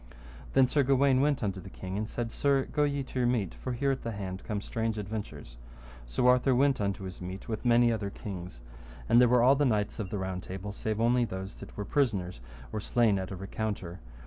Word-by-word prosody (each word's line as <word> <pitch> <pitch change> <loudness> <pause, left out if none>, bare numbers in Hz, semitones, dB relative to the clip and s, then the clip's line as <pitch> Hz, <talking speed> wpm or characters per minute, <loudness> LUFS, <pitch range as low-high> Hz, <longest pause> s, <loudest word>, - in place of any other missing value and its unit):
Then 135 - +6
Sir 145 +3 +2
Gawaine 135 0 +4
went 145 -3 +1
unto 95 -2 -2
the 95 - -10
king 95 0 -6
and 110 +2 -2
said, 115 -1 -3
Sir, 140 0 +2
go 150 0 +1
to - - 0 0.3
your 120 - +3
meat, 115 -8 0
for 130 - -5
here 135 +3 +1
at 135 - -2
the 115 - -4
hand 95 -2 -5
come 105 -2 -2
strange 110 +1 -2
adventures. 105 - -6 0.5
So - - 0
Arthur 125 +1 +5
went 135 -2 +3
unto 100 -1 -1
his 95 -1 -7
meat 95 +2 -7
with 110 -2 -4
many 120 -1 +5
other 105 -3 -2
kings. 90 - -8 0.5
And 115 +2 +6
there 125 - +6
were 125 -1 +5
all 135 +3 +6
the 145 - +2
knights 110 -4 0
of 100 -4 -3
the 105 - -3
Round 95 -1 -3
Table, 95 +3 -6
[save] 110 +1 -3
only 120 +2 +3
those 95 -2 -5
that - - -11
were 105 - -3
prisoners 100 - 0 0.3
or 110 - -1
slain 105 -1 +2
at 95 - -4
a 95 - -5
recounter. 95 -2 -4
110 Hz, 225 wpm, -30 LUFS, 95-125 Hz, 0.5 s, Then